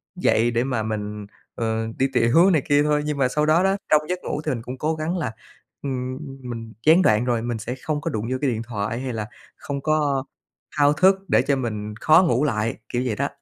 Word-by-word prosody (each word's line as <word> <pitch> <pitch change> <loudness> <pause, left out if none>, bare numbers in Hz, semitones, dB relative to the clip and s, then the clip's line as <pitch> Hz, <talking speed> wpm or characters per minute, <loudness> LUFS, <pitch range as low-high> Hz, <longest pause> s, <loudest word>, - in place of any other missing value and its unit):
dậy 115 +2 +2
để 120 0 +1
mà 130 -4 -1
mình, 105 -1 -4 0.3
ờ, 110 -1 -1
đi 135 - +3
tiểu 125 +10 +5
này 160 -6 +3
kia 145 0 +4
thôi. 150 0 +2
Nhưng 150 -1 -2
mà 135 -2 +3
sau 150 +4 0
đó 160 +4 +4
đó, 195 0 +3 0.2
trong 150 - +6
giấc 180 0 -1
ngủ - - -3
thì 155 - 0
mình 120 -4 -3
cũng 125 +3 -7
cố 155 +4 -1
gắng 160 +4 -2
là, 150 -10 -2 0.5
ưm, 130 -2 -3
ừm, 135 -2 -9
mình 115 -2 -7
gián 165 +4 +7
đoạn 110 -8 +3
rồi 120 -2 0
thì 120 - -5
mình 120 -2 -2
sẽ 115 +3 -5
không 150 -2 -2
có 165 - -2
đụng 110 -7 -3
vô 130 - 0
cái 140 - +2
điện 110 -1 -3
thoại, 110 0 -3
hay 130 -1 -4
là 105 -2 -4 0.3
không 140 -1 -5
có 145 -3 +1 0.5
thao 145 0 +5
thức 185 +6 +5
để - - +4
cho 140 - +1
mình 105 -5 -4
khó 160 +4 +6
ngủ 125 +3 +2
lại, 110 -6 0
kiểu 120 - -1
vậy 115 -4 -1
đó. - - 0
130 Hz, 245 wpm, -23 LUFS, 115-150 Hz, 0.5 s, gián